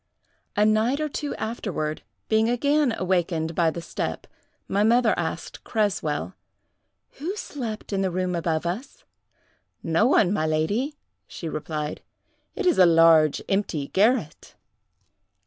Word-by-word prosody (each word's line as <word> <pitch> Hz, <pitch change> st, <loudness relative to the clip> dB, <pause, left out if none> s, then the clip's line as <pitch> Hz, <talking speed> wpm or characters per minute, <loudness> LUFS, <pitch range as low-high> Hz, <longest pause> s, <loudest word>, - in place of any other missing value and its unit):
"A 210 Hz, -, +4 dB
night 220 Hz, +6 st, +2 dB
or 305 Hz, -, 0 dB
two 295 Hz, 0 st, -4 dB
afterward, 195 Hz, -9 st, -3 dB, 0.3 s
being 220 Hz, +1 st, +2 dB
again 285 Hz, +3 st, +2 dB
awakened 175 Hz, -3 st, 0 dB
by 165 Hz, 0 st, +2 dB
the 170 Hz, +1 st, -6 dB
step, -, -, -4 dB, 0.4 s
my 200 Hz, -, 0 dB
mother 235 Hz, +1 st, +4 dB
asked 165 Hz, -1 st, -5 dB
Creswell, 195 Hz, -6 st, -1 dB, 0.9 s
'Who 345 Hz, +8 st, -3 dB
slept 230 Hz, -, -6 dB
in 195 Hz, -, +1 dB
the 190 Hz, -, +1 dB
room 185 Hz, 0 st, -1 dB
above 165 Hz, -1 st, -1 dB
us?' 205 Hz, +11 st, -5 dB, 0.8 s
'No 165 Hz, +7 st, +2 dB
one, 205 Hz, -8 st, +4 dB
my 160 Hz, -6 st, 0 dB
lady,' 205 Hz, -, 0 dB, 0.3 s
she 165 Hz, -, -7 dB
replied—'it 155 Hz, -, -6 dB
is 355 Hz, -, +3 dB
a 185 Hz, -, +8 dB
large, 165 Hz, -2 st, +5 dB
empty 185 Hz, -8 st, -1 dB
garret. 210 Hz, -, +1 dB
195 Hz, 130 wpm, -25 LUFS, 165-235 Hz, 0.9 s, a